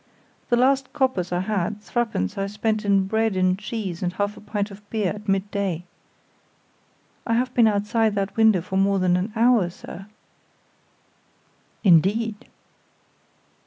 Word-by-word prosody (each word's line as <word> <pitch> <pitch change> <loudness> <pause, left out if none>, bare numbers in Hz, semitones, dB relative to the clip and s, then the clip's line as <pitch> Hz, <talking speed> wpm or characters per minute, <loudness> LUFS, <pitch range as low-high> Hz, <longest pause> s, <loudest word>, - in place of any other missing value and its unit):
"The 240 - +4
last 265 +1 +2
coppers, 225 -10 0
I 175 0 0
had, 205 0 -2
three 240 +3 -1
pence, 95 - -3
I 195 0 -2
spent 215 +1 -1
in 200 -2 +3
bread 220 +1 0
and 185 0 +3
cheese 210 -5 -5
and 180 -1 -1
half 205 +2 -2
a - - -13
pint 205 0 -3
of 200 +1 -11
beer 215 -4 0
at 210 0 -8
midday. 195 -3 -1 1.4
I 230 - +1
have 250 +1 0
been 235 -2 +5
outside 210 +1 +1
that 195 0 -2
window 220 -5 +4
for 190 +2 -4
more 195 0 +3
than 185 -1 +2
an 185 +4 -1
hour, 230 -5 +3
sir." 185 +2 -10 1.8
"Indeed!" 205 +4 +3
205 Hz, 150 wpm, -23 LUFS, 190-225 Hz, 1.8 s, been